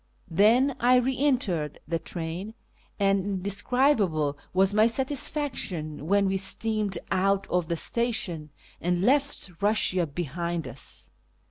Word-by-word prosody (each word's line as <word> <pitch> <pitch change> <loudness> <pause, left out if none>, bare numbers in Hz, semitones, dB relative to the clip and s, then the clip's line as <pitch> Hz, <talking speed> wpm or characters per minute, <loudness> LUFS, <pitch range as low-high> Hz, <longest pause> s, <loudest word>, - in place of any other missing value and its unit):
Then 235 - +4
I 250 +1 +4
re 255 +1 +2
entered 230 - 0
the 165 +1 -1
train, 175 +7 -6 0.4
and 195 -1 +2
indescribable 195 - +1 0.2
was 190 +2 +3
my 215 +2 +5
satisfaction 235 - -2
when 200 +2 +3
we 190 0 +1
steamed 210 0 0
out 195 +1 +1
of 180 -2 +1
the 170 - -1
station 185 -9 0 0.3
and 175 +1 0
left 275 -4 +1
Eussia 200 -4 +2
behind 170 +1 -3
us. 125 +2 -4
195 Hz, 120 wpm, -26 LUFS, 170-235 Hz, 0.4 s, my